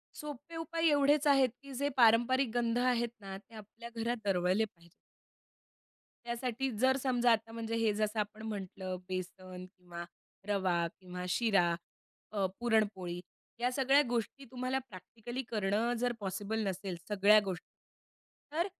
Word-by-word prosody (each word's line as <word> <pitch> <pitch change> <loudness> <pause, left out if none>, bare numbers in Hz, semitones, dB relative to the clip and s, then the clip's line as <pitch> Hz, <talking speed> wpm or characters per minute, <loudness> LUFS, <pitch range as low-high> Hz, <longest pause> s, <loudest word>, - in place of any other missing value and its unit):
सोपे 300 +3 -7
उपाय 330 0 +1
एवढेच 290 +1 +4
आहेत 270 -2 +6
की 280 -1 -10
जे 285 +3 0
पारंपरिक 240 +2 +5
गंध 235 -1 +1
आहेत 245 -1 +2
ना, 195 -1 -6
ते 215 +3 -19
आपल्या 220 +2 -10
घरात 240 +2 0
दरवळले 190 +2 +2
पाहिजेत. 170 -5 -14 1.3
त्यासाठी 245 +2 -2
जर 260 +3 +4
समजा 245 -2 +3
आता 225 0 0
म्हणजे 230 0 -3
हे 225 -2 +3
जसं 215 +1 0
आपण 210 +1 -4
म्हटलं 190 -2 -4
बेसन 185 0 -5
किंवा 175 -2 -8 0.4
रवा 190 -3 +2 0.2
किंवा 180 -1 -6
शिरा, 190 -5 +3 0.6
अ, 200 -3 +1
पुरणपोळी 205 -7 +1 0.4
ह्या 245 +1 +1
सगळ्या 270 +2 +5
गोष्टी 240 +3 -2
तुम्हाला 255 +1 -1
प्रॅक्टिकली 235 +6 -7
करणं 215 +2 +1
जर 245 +1 +1
पॉसिबल 205 +3 -2
नसेल, 190 -1 -3
सगळ्या 210 +1 +6
गोष्टी 185 -3 -5 0.8
तर 335 +4 +1
225 Hz, 135 wpm, -33 LUFS, 195-250 Hz, 1.3 s, आहेत